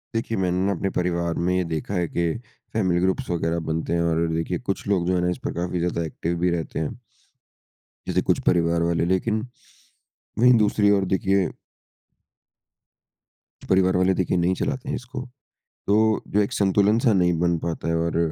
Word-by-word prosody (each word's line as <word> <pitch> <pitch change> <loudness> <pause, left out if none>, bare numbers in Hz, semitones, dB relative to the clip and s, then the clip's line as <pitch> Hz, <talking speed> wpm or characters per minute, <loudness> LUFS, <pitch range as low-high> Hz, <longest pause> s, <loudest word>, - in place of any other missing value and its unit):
देखिए 115 0 -1
मैंने 90 0 0
न - - -1
अपने 95 +3 -2
परिवार 85 -2 -1
में 90 - +2
ये 90 - +1
देखा 80 +5 -3
है 90 -3 0
कि 85 0 -1 0.4
फैमिली 95 -5 +1
ग्रुप्स 95 +1 0
वगैरह 85 -1 0
बनते 80 +1 -2
हैं 85 - +1
और 85 0 +1
देखिए 80 +2 -2
कुछ 95 - -4
लोग 95 -4 +1
जो 90 - +2
हैं 90 - +1
न 90 - +1
इस - - -3
पर - - -2
काफ़ी 90 +1 -2
ज़्यादा 85 0 -1
एक्टिव 85 +2 -3
भी 90 +1 +2
रहते 85 -2 -3
हैं। 80 - -3 1.1
जैसे - - +1
कुछ - - +3
परिवार 85 -1 +3
वाले 85 0 +1
लेकिन 95 +5 +1 1.0
वहीं 125 +2 +7
दूसरी 105 -1 +3
ओर 95 - 0
देखिए 95 -1 +1 2.1
कुछ - - -13
परिवार 95 -1 +3
वाले 95 +1 +3
देखिए 90 0 0
नहीं 90 +1 +2
चलाते 135 +2 -3
हैं - - -1
इसको। 125 +1 -6 0.7
तो 110 +1 +3
जो 105 - +2
एक 100 - -1
संतुलन 100 +2 +3
सा 115 -2 +3
नहीं 90 -2 +3
बन 85 0 +2
पाता 80 0 -4
है 85 - +1
और 85 0 -1
90 Hz, 185 wpm, -24 LUFS, 85-100 Hz, 2.1 s, वहीं